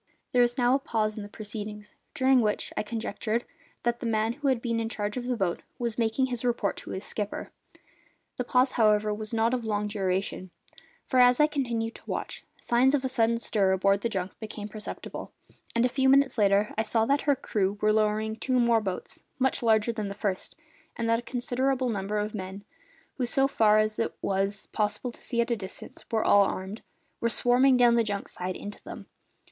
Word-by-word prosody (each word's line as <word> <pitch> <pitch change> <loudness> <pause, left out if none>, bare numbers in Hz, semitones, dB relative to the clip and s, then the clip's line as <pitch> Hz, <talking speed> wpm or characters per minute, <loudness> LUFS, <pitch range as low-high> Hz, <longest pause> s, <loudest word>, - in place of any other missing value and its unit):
There 250 - +5
was 240 0 +2
now 245 0 +3
a 275 - +3
pause 215 -5 -1
in 215 - -5
the 205 - -8
proceedings, 210 0 -7 0.2
during 260 -1 +4
which, 210 -2 -1
I - - 0
conjectured, 220 +1 -3 0.4
the 240 0 +1
man 225 0 +1
who 285 +2 -3
had 260 -3 +3
been 230 -1 -1
in 225 0 -2
charge 210 -2 -3
of 250 -1 -4
the 250 -1 0
boat 185 -5 -1 0.2
was 235 -2 -3
making 230 +3 +2
his 245 -2 -4
report 235 -5 0
to - - -9
his 190 - -5
skipper. 210 -1 -4 0.9
The 250 - -1
pause, 250 +2 +3
however, 215 -2 +3
was 215 0 -5
not 230 +1 +2
of 245 -2 -1
long 210 -1 0
duration, 190 -2 -2 0.6
for, 260 - +1
as 245 +1 +6
I 300 - +7
continued 240 -6 -2
to - - -14
watch, - - -4 0.2
signs 255 +4 +3
of 270 -2 -1
a - - +2
sudden 235 -3 +2
stir 200 -4 +1
aboard 195 +1 +2
the 235 - 0
junk 190 -3 -3
became 215 -2 -6
perceptible, 210 0 -7 0.4
and 235 +1 +3
a - - +5
few 265 +1 +2
minutes 275 -1 +4
later 205 -1 +3
I 220 - +1
saw 225 0 +1
that 280 +4 +2
her 285 - +5
crew 205 -5 -1
were 215 0 +3
lowering 215 0 +1
two 255 +2 +1
more 235 -2 +4
boats, 190 -3 -4 0.2
much 265 0 +1
larger 220 -1 +3
than 215 -2 -3
the 200 - -6
first, 200 -2 -2 0.4
and 230 - -2
that 230 - +3
a - - -6
considerable 255 +1 -1
number 205 -1 -2
of 210 0 -2
men 195 -1 -6 0.5
who, 250 -3 0
so 270 +2 +2
far 215 -5 +4
as 215 0 +1
it 230 - -1
was 195 +1 -1
possible 215 +3 -1
to - - -12
see 235 -2 0
at 235 - -1
that 235 - +1
distance, 190 -1 -9
were 220 -2 0
all 200 -1 +6
armed 190 +3 -4 0.4
were 235 - +1
swarming 250 +2 +4
down 240 -1 +6
the 235 0 +4
junk's 200 -2 -3
side 180 0 -4
into 205 0 -8
them. - - -9
225 Hz, 210 wpm, -28 LUFS, 210-245 Hz, 0.9 s, I